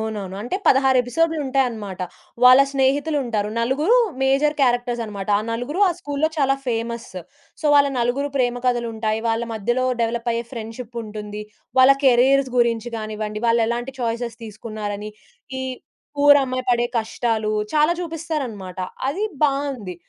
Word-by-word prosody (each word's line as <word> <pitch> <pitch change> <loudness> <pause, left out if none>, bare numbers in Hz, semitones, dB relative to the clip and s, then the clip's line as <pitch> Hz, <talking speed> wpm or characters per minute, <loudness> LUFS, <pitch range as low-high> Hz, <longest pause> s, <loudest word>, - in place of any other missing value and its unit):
అవునవును. 205 -4 -4
అంటే 245 +11 -2
16 265 -1 +5
ఎపిసోడులుంటాయన్నమాట. 260 - -1 0.4
వాళ్ళ 255 +2 +9
స్నేహితులుంటారు. 265 -5 0
నలుగురు 295 - +2 0.3
మేజర్ 280 +3 +2
క్యారెక్టర్స్ 245 -2 +1
అన్నమాట. 200 -2 -7
ఆ - - -2
నలుగురు, 245 - -3
ఆ - - +2
స్కూల్‌లో 290 -1 -1
చాలా 270 -1 +3
ఫేమస్. 235 0 -3 0.5
సో, - - -13
వాళ్ళ 285 0 +6
నలుగురు 250 +4 0
ప్రేమ 245 -1 +1
కథలుంటాయి, 225 -3 -1
వాళ్ళ 225 +1 0
మధ్యలో 240 +4 0 0.2
డెవలప్ 235 +1 -1
అయ్యే 230 +1 -2
ఫ్రెండ్‌షిప్పుంటుంది, 220 -3 -7 0.4
వాళ్ళ 260 +1 +8
కేరియర్స్ 265 +2 +4
గురించి 235 -1 +1
గానివ్వండి, 215 -1 -4
వాళ్ళెలాంటి 235 +3 +1
చాయిసెస్ 235 0 -2
తీసుకున్నారని, 215 -1 -6 0.5
ఈ - - -3 0.5
పూర్ 285 0 +7
అమ్మాయి 255 -1 -3
పడే 240 0 +2
కష్టాలు, 220 -1 -1 0.2
చాలా 305 +3 +4
చూపిస్తారన్నమాట. 295 - -5 0.3
అది 385 +10 -1 0.2
బావుంది. 275 -9 -1
240 Hz, 125 wpm, -22 LUFS, 220-275 Hz, 0.5 s, వాళ్ళ